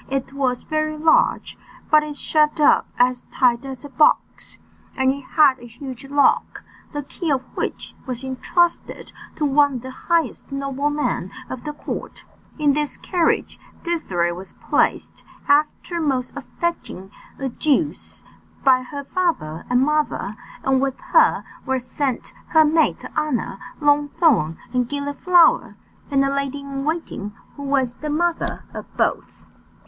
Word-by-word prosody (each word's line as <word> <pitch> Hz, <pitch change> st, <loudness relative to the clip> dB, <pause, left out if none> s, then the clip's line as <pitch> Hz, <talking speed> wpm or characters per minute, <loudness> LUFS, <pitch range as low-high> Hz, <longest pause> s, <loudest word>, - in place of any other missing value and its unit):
It 270 Hz, 0 st, -2 dB
was 260 Hz, -3 st, -1 dB
very 310 Hz, 0 st, -1 dB
large, 315 Hz, +1 st, +2 dB, 0.3 s
but 305 Hz, 0 st, +7 dB
it 300 Hz, -1 st, -6 dB
shut 300 Hz, +1 st, +1 dB
up 295 Hz, -, +5 dB
as 250 Hz, 0 st, +2 dB
tight 240 Hz, -1 st, +2 dB
as 265 Hz, -1 st, -7 dB
a -, -, -8 dB
box, 280 Hz, +3 st, +1 dB, 0.4 s
and 265 Hz, 0 st, +3 dB
it 280 Hz, -, -7 dB
had 275 Hz, -1 st, +4 dB
a 240 Hz, -, -11 dB
huge 255 Hz, +2 st, -9 dB
lock, 285 Hz, +1 st, +2 dB, 0.3 s
the 290 Hz, -1 st, -4 dB
key 325 Hz, +4 st, -5 dB
of 265 Hz, -3 st, +1 dB
which -, -, -4 dB
was 250 Hz, 0 st, -4 dB
entrusted 335 Hz, +6 st, -1 dB, 0.2 s
to 300 Hz, -, -1 dB
one 285 Hz, 0 st, +4 dB
of 245 Hz, -, -4 dB
the 260 Hz, -, -6 dB
highest 325 Hz, -1 st, -1 dB
noblemen 275 Hz, +2 st, -1 dB, 0.2 s
of 255 Hz, +2 st, -6 dB
the 300 Hz, -, -3 dB
court. 295 Hz, -, -6 dB, 0.3 s
In 295 Hz, -2 st, +3 dB
this 295 Hz, 0 st, -1 dB
carriage 345 Hz, -3 st, 0 dB, 0.2 s
Désirée 180 Hz, -, -1 dB
was 185 Hz, +2 st, -10 dB
placed, -, -, 0 dB, 0.2 s
after 300 Hz, +4 st, +1 dB
most 265 Hz, -5 st, -1 dB
affecting 280 Hz, -, -4 dB, 0.3 s
adieus, 285 Hz, +3 st, -1 dB, 0.4 s
by 260 Hz, -2 st, +5 dB
her 280 Hz, +3 st, -7 dB
father 275 Hz, -, -2 dB
and 250 Hz, +2 st, +3 dB
mother; 300 Hz, -8 st, 0 dB, 0.3 s
and 265 Hz, -1 st, +2 dB
with 270 Hz, -1 st, -1 dB
her 480 Hz, -1 st, +5 dB, 0.2 s
were 265 Hz, 0 st, 0 dB
sent 255 Hz, +1 st, -3 dB
her 315 Hz, -1 st, +5 dB
maids 315 Hz, +1 st, +2 dB
of -, -, -10 dB
honour 255 Hz, -9 st, -1 dB, 0.2 s
Longthorn 290 Hz, -, +3 dB, 0.2 s
and 250 Hz, -1 st, +1 dB
Gilliflower, 290 Hz, +5 st, +3 dB, 0.3 s
and 275 Hz, -1 st, +3 dB
a 275 Hz, -, 0 dB
lady 280 Hz, 0 st, -2 dB
in 275 Hz, 0 st, -5 dB
waiting, 310 Hz, -10 st, -3 dB, 0.2 s
who 285 Hz, -, -9 dB
was 275 Hz, -3 st, +1 dB
the 300 Hz, +4 st, -6 dB
mother 335 Hz, +3 st, -1 dB
of -, -, -7 dB
both. -, -, -1 dB
280 Hz, 145 wpm, -22 LUFS, 255-305 Hz, 0.4 s, but